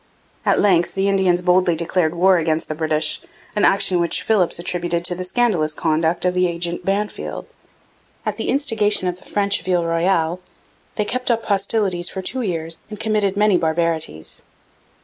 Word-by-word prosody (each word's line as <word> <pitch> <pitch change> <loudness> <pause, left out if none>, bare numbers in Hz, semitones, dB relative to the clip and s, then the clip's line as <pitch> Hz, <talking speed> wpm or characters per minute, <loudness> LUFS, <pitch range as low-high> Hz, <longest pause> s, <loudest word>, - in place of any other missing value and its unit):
At - - +3
length 180 -4 +2
the 195 0 +1
Indians 190 -3 +2
boldly 180 -1 +3
declared 170 0 0
war 185 +2 +4
against 160 -1 -1
the - - -1
British, 155 0 0 0.3
an 210 - +1
action 195 -2 +3
which 170 -1 0
Philipps 200 -6 +1
attributed 175 0 -2
to 180 - +3
the 180 +1 -5
scandalous 180 -6 +1
conduct 160 +3 0
of 180 - +2
the 180 0 +2
agent 170 0 -3
Bannfield. 205 +2 -3 0.8
At - - -1
the - - -2
instigation 215 -8 +1
of 180 0 -2
the - - -18
French 200 0 0
of - - -16
Ile 175 -2 +2
Royale, 165 0 +1 0.6
they 210 - 0
kept 250 +3 -2
up 230 -1 0
hostilities 195 -3 0
for 190 - -6
two 260 +7 -2
years 165 -6 -3
and 210 - -8
committed 210 -3 0
many 210 -2 +4
barbarities. 160 - -2
180 Hz, 170 wpm, -20 LUFS, 170-200 Hz, 0.8 s, war